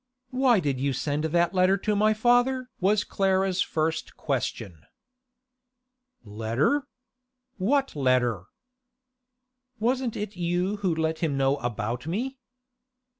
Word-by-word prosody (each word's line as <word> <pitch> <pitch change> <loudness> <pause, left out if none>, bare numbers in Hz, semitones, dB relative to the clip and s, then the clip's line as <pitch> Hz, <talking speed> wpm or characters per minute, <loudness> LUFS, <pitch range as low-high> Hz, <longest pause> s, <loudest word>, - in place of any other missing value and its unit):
'Why 255 -4 +3
did 140 -6 -1
you 140 +1 0
send 145 +4 -2
that 170 +2 +1
letter 185 +1 +4
to 210 +2 -1
my 215 +1 +3
father?' 245 +3 +2
was 205 +2 +2
Clara's 190 -1 +1
first 160 0 -2
question. 85 -6 -3 1.4
'Letter? 115 - 0 0.7
What 270 - +1
letter?' 125 - +1 1.3
'Wasn't 245 +1 0
it 210 0 -5
you 180 +3 -1
who 190 -5 0
let 160 0 -1
him 150 -5 -1
know 135 +1 +2
about 120 +1 -3
me? 255 +10 -3
180 Hz, 115 wpm, -26 LUFS, 140-215 Hz, 1.4 s, letter